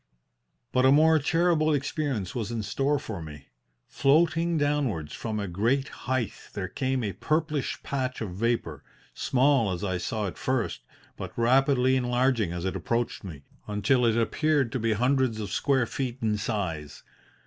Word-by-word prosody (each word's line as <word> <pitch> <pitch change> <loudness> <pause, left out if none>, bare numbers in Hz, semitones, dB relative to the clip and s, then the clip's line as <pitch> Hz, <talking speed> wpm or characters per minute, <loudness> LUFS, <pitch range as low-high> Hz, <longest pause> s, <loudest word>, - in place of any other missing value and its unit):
"But 130 - +2
a 130 - +6
more 160 +2 +5
terrible 155 0 +2
experience 135 - -2
was 115 -4 -3
in 115 -2 -2
store 135 +8 0
for 110 -9 -6
me. 75 -3 -10 0.4
Floating 165 +4 +2
downwards 140 - 0
from 110 -2 -3
a 100 - -3
great 115 +10 0
height 130 -4 -2 0.2
there - - -3
came 130 -1 -1
a 100 -3 -2
purplish 150 - -1
patch 130 -2 -2
of 110 -5 -4
vapour, 100 -8 -1 0.3
small 130 -5 +2
as 90 +2 -4
I 95 -2 -1
saw 105 +4 -2
it 95 - -6
first, - - -1 0.4
but - - -7
rapidly 130 +2 +3
enlarging 125 -5 +1
as 85 +1 -4
it 95 - -2
approached 115 +7 -2
me, 80 -8 -9 0.2
until 105 +5 +2
it 115 -1 +3
appeared 140 +2 +1
to 130 - -2
be 115 0 +1
hundreds 125 0 +1
of 105 -2 -4
square 135 0 +2
feet 125 +1 -3
in 110 -3 0
size. 90 -9 -3
120 Hz, 160 wpm, -27 LUFS, 105-140 Hz, 0.4 s, a